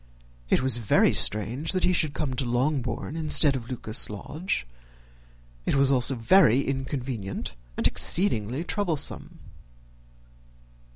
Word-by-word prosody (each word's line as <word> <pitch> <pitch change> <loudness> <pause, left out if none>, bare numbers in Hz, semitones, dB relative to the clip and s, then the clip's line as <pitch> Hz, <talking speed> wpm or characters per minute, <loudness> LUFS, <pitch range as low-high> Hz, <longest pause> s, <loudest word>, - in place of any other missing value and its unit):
It - - +2
was 130 -3 +1
very 110 - +3
strange 110 - +2
that 185 - -1
he 180 - +3
should 155 -5 +1
come 140 -3 -3
to 130 - -1
Longbourn 130 +3 -2
instead 155 -3 +3
of 125 -3 -5
to - - -14
Lucas 110 -3 -4
Lodge; 145 - -4 1.0
it - - +1
was 140 0 +3
also 130 0 +1
very 125 - +4
inconvenient 130 - -4 0.2
and - - -1
exceedingly 135 - +1
troublesome. 175 -5 -1
135 Hz, 125 wpm, -25 LUFS, 120-155 Hz, 1.0 s, very